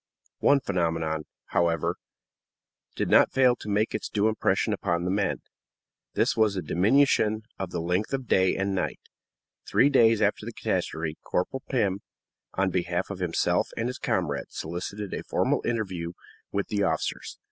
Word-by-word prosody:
One 140 0 +5
phenomenon, 80 -5 -1 0.2
however, 85 -2 +1 1.0
did - - -1
not - - +5
fail 130 -2 +5
to 105 - -8
make 105 +2 +1
its - - -3
due 105 0 +2
impression 110 - +1
upon 85 0 -1
the 90 - 0
men; 100 0 0 0.7
this - - +2
was 110 -2 +3
the 95 - -2
diminution 110 - +3 0.2
in 95 -2 -3
the - - -3
length 90 +5 -1
of 135 -2 -2
day 95 -2 +3
and 95 0 0
night. 95 - -2 0.7
Three 140 +3 +4
days 115 -5 +5
after 105 -1 +1
the - - -6
catastrophe, 80 -1 -2
Corporal 130 +9 -2
Pim, 100 -7 +1 0.6
on 95 0 +1
behalf 90 +1 -1
of 100 - -6
himself 90 -3 +1
and 115 - 0
his 125 - -6
comrades, 90 - -2
solicited 90 +5 -5
a - - -3
formal - - 0
interview 95 -7 -2 0.4
with 100 0 -2
the 105 -2 0
officers. - - -2
95 Hz, 160 wpm, -27 LUFS, 85-110 Hz, 1.0 s, One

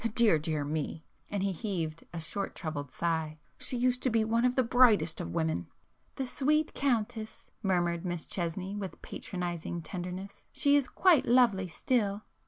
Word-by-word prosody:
Dear 220 -9 +5
dear 155 -1 -1
me!" 155 +1 -3 0.2
and 200 -2 -1
he 200 - +1
heaved 165 -4 -3
a 170 - -5
short 165 +5 -3
troubled 145 -4 -4
sigh—"She 160 +6 -2
used 250 +1 +1
to 255 - +2
be 225 -1 +2
one 230 +2 +2
of 250 0 +2
the 260 - +4
brightest 225 -10 +4
of - - -5
women!" 160 - 0 0.5
"The 270 - -2
sweet 300 +4 +1
Countess!" 230 -4 -2
murmured 175 -3 +1
Miss 175 -3 -3
Chesney 185 +2 -3
with 195 -3 -5
patronizing 175 -2 -4
tenderness—"She 185 - -1
is 280 -3 +3
quite 350 -2 +4
lovely 230 -6 +4
still!" 205 +3 0
190 Hz, 155 wpm, -30 LUFS, 165-240 Hz, 0.5 s, Dear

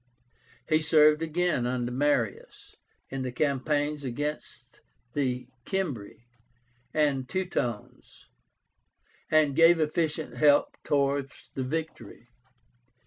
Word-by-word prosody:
He 155 -1 +3
served 155 0 +4
again 165 -5 0
under 125 -1 -2
Marius 125 -5 -1 0.4
in 135 0 -3
the 130 -1 -3
campaigns 145 +2 0
against 145 +4 -5 0.3
the 125 -3 -1 0.2
Cimbri 130 - -4 0.7
and 140 -4 0
Teutones, 160 - -4 1.0
and 155 -3 +3
gave 165 +1 +6
efficient 160 0 -1
help 145 -1 +4
towards 140 -1 -1
the 135 - -3
victory. 155 -3 -5
145 Hz, 90 wpm, -28 LUFS, 130-155 Hz, 1.0 s, gave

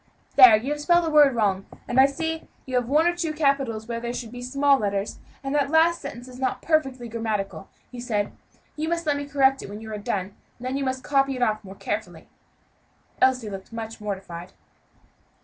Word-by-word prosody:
"There, 250 -5 +10
you 250 +7 -4
have 295 0 -2
spelled 345 +3 +4
a 320 - -1
word 295 -4 +6
wrong, 195 -4 0 0.2
and 245 - +1
I 265 - +8
see 320 +3 -4 0.2
you 260 - -8
have 245 -2 +1
one 305 +4 +4
or 345 0 +2
two 335 -3 -2
capitals 275 -7 0
where 235 -1 -3
there 240 +1 -4
should 230 -3 -6
be 245 - -8
a - - -7
small 275 +2 +3
letter; 200 -2 0 0.4
and 270 +1 -3
that 285 -1 +2
last 325 +2 +4
sentence 245 +1 -8
is 255 0 -11
not 260 - -1
perfectly 270 -6 0
grammatical," 215 -4 -3 0.2
he 250 - -8
said. 215 -4 -1 0.4
"You 310 +1 -2
must 335 -1 -1
let 295 -2 +2
me 285 0 -4
correct 270 -1 +3
it - - -8
when 205 +1 -7
you 220 0 -8
are 210 - -4
done, 195 -1 -3 0.2
and 245 - -10
then 255 +1 -2
you 275 - -1
must 260 -1 -2
copy 275 -1 +2
it 250 - 0
off 215 -2 0
more 195 0 -10
carefully." - - -5 0.9
Elsie 255 -3 +3
looked 195 -1 -7
very 230 - -11
much 225 0 -11
mortified. 190 -3 -6
255 Hz, 220 wpm, -25 LUFS, 220-285 Hz, 0.9 s, There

